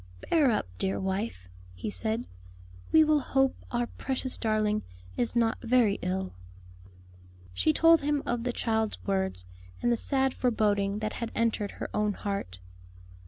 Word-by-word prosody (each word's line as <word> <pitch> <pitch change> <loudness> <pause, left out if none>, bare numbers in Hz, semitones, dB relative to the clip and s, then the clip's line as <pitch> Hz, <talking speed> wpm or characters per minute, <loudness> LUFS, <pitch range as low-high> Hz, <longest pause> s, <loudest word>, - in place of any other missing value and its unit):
"Bear 305 -5 +5
up, 215 - +1
dear 190 - 0
wife," 190 - -3 0.3
he 90 - -4
said, 225 +3 -2 0.7
"we 315 - +7
will 305 -1 +4
hope 270 -1 +1
our 240 0 0
precious 260 +1 -2
darling 215 -1 +1 0.3
is 240 0 -1
not 230 -1 +2
very 230 -4 +3
ill." 185 +1 -2 1.2
She 90 +12 +2
told 330 - +5
him 290 0 0
of 240 -1 -1
the 250 - 0
child's 220 -2 0
words, 190 - -1 0.3
and 240 - +1
the - - +4
sad 265 +2 +1
foreboding 205 -4 +1
that 215 0 -2
had 235 -1 -4
entered 225 -3 +1
her - - -5
own 210 -1 +1
heart. 195 - -4
225 Hz, 150 wpm, -29 LUFS, 200-250 Hz, 1.2 s, we